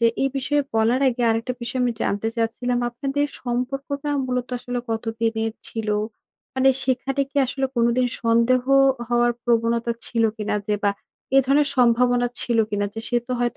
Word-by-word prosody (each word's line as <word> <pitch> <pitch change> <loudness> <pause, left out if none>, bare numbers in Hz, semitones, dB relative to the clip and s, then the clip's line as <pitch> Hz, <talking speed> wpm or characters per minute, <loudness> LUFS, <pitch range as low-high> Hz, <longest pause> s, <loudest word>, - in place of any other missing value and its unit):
যে 235 - +5 0.2
এই 270 - +3
বিষয়ে 285 +2 +1
বলার 225 +4 +2
আগে 245 0 -2
আরেকটা 230 +3 -1
বিষয় 255 +2 -2
আমি 245 -1 +1
জানতে 205 +3 0
চাচ্ছিলাম। 245 +2 -1
আপনাদের 275 +4 -1 0.2
সম্পর্কটা 275 +4 -3 0.2
মূলত 250 -1 -2
আসলে 245 0 -4
কতদিনের 225 0 -1 0.2
ছিল? 225 -2 -4 0.7
মানে 265 0 +4 0.2
সেখানে 270 +2 0
কি 285 - -14
আসলে 270 +1 -1
কোনদিন 235 +2 +3 0.2
সন্দেহ 235 +2 +3 0.5
হওয়ার 240 0 +3
প্রবণতা 235 0 +1
ছিল 230 -2 0
কিনা? 210 -1 -2
যে 210 - +1
বা 200 - +4 0.5
এ - - +9
ধরনের 285 +1 +3
সম্ভাবনা 245 0 +3
ছিল 235 -2 0
কিনা, 205 0 0
যে 225 - -4
সে 240 - +1
তো 255 - -3
হয়তো 240 0 0
245 Hz, 165 wpm, -23 LUFS, 230-255 Hz, 0.7 s, এ